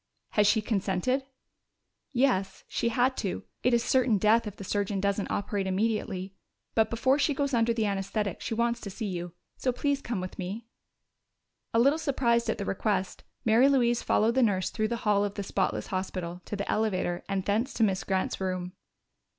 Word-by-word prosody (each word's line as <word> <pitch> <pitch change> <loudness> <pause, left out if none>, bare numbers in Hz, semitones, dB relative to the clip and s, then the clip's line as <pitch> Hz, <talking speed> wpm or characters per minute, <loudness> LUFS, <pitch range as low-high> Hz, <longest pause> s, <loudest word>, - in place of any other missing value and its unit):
"Has 210 -1 +3
she 215 +1 +3
consented?" 210 +5 0 0.9
"Yes. 240 -8 +1
She 235 - 0
had 250 +3 +2
to. 195 -4 -3 0.2
It 250 - +3
is 235 -1 +3
certain 245 -3 +3
death 215 +3 +3
if 205 - -6
the - - -8
surgeon 200 0 -1
doesn't 200 +1 0
operate 200 -1 -1
immediately. 195 -1 -1 0.4
But 220 -1 +3
before 260 +5 +2
she 290 0 +2
goes 280 0 -1
under 235 -1 +3
the 225 -2 0
anesthetic 200 0 -2
she 225 - -3
wants 235 +1 0
to 200 - -6
see 220 +4 -5
you. 175 -3 -4 0.2
So 255 - 0
please 280 +2 0
come 235 -7 -3
with 185 0 -6
me." 195 +5 -4 1.1
A - - +1
little 275 +7 +4
surprised 235 -6 +1
at - - 0
the 200 - -3
request, 195 -1 -1 0.2
Mary 230 +5 +5
Louise 240 -3 +3
followed 225 +2 +2
the 260 - +3
nurse 195 -6 +2
through 215 -1 0
the 235 +1 -2
hall 205 -1 +4
of 205 0 -2
the 200 - -3
spotless 190 -1 -1
hospital 180 -2 -3
to - - -4
the 200 0 -4
elevator 185 -5 0
and 195 -1 -1
thence 220 +6 +1
to 230 - +2
Miss 190 -4 +1
Grant's 190 0 -1
room. 185 -1 -2
215 Hz, 190 wpm, -28 LUFS, 195-235 Hz, 1.1 s, Mary